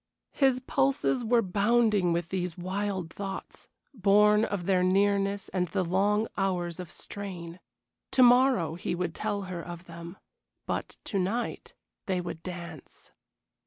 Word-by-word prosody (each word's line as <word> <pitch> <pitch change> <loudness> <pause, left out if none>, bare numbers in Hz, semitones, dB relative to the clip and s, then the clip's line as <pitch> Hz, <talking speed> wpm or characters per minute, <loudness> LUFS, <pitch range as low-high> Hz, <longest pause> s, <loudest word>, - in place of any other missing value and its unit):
His 265 -3 +2
pulses 135 - +1
were 235 0 +3
bounding 205 -1 +2
with 170 0 -1
these 180 -2 -3
wild 185 -1 -3
thoughts, 195 -1 -7 0.3
born 210 -1 +5
of 200 -5 -2
their 185 -1 +3
nearness 200 +1 +2
and 180 -1 0
the 185 +3 -1
long 205 +5 +2
hours 180 -3 -1
of 180 -3 -6
strain. 180 -4 -7 0.5
To 255 - +5
morrow 245 - +5
he 175 +1 -3
would 175 -2 -2
tell 205 0 -2
her 185 -2 -5
of 175 0 -8
them, 170 +2 -9 0.5
but - - -4
to 200 - -2
night 210 +7 -2 0.3
they 185 -2 0
would 175 -2 -5
dance. 175 -4 -9
190 Hz, 140 wpm, -28 LUFS, 175-205 Hz, 0.5 s, born